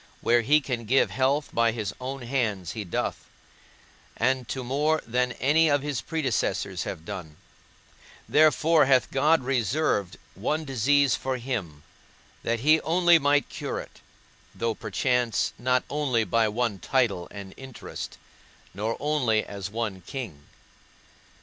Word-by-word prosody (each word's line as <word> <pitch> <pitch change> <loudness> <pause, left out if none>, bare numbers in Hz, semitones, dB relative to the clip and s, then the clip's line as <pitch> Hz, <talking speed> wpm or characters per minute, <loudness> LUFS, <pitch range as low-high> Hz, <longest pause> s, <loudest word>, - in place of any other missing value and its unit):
Where 120 0 +4
he 150 +6 +4
can 120 -4 -4
give 130 +5 +3
health 140 +3 +1
by 115 0 +3
his 105 -4 -3
own 130 0 -5
hands 110 -9 -1
he 110 - -5
doth, 90 - -3 0.9
and 130 +1 +1
to 130 +4 -4
more 150 +5 +1
than 125 +1 0
any 155 +4 +3
of 145 -1 +2
his 145 -4 -2
predecessors 110 - -1
have 80 -4 -6
done: 80 -5 -7 0.9
therefore 155 0 +4
hath 130 -2 +3
God 150 +2 +3
reserved 125 - 0 0.2
one 155 +10 -2
disease 135 0 +3
for 130 +3 -2
him, 105 - -4 0.6
that 115 0 -1
he 155 +4 +5
only 175 0 +4
might 145 0 +2
cure - - -4
it, - - -11 0.5
though 115 0 -1
perchance 125 0 0
not 125 +1 +2
only 140 -6 0
by 115 0 +2
one 110 -2 -1
title 115 -10 0
and 100 -1 -9
interest, 135 -2 -8 0.6
nor 110 +4 -2
only 130 -8 +1
as 100 -2 -6
one 105 -3 -3
king. 105 - -7
125 Hz, 135 wpm, -26 LUFS, 110-145 Hz, 0.9 s, he